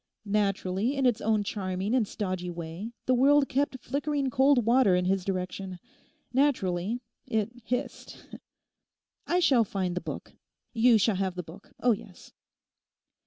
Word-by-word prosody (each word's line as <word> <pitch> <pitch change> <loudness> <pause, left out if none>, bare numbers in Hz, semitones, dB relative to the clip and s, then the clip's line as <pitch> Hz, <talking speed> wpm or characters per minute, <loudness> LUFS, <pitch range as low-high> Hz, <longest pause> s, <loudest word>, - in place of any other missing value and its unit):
Naturally, 200 +3 0
in 270 -1 0
its 245 -3 +2
own 215 -1 +1
charming 195 +1 -3
and 245 -5 +2
stodgy 185 -4 -3
way 170 +5 -6
the 255 - +3
world 275 +3 +5
kept 275 0 0
flickering 280 0 -2
cold 265 -2 +4
water 235 -5 +4
in 180 0 +1
his 190 0 +1
direction. 185 0 -4 0.6
Naturally 235 -6 +1 0.3
it 220 0 0
hissed.... 250 +4 -5 1.0
I 355 - +2
shall 270 -9 +4
find 190 -3 -2
the 180 - -3
book. - - -7 0.4
You 235 0 +5
shall 210 -1 +2
have 190 -1 -1
the 180 - -4
book; 170 +5 -14
oh 245 - +4
yes. 195 -4 -6
210 Hz, 145 wpm, -28 LUFS, 185-255 Hz, 1.0 s, world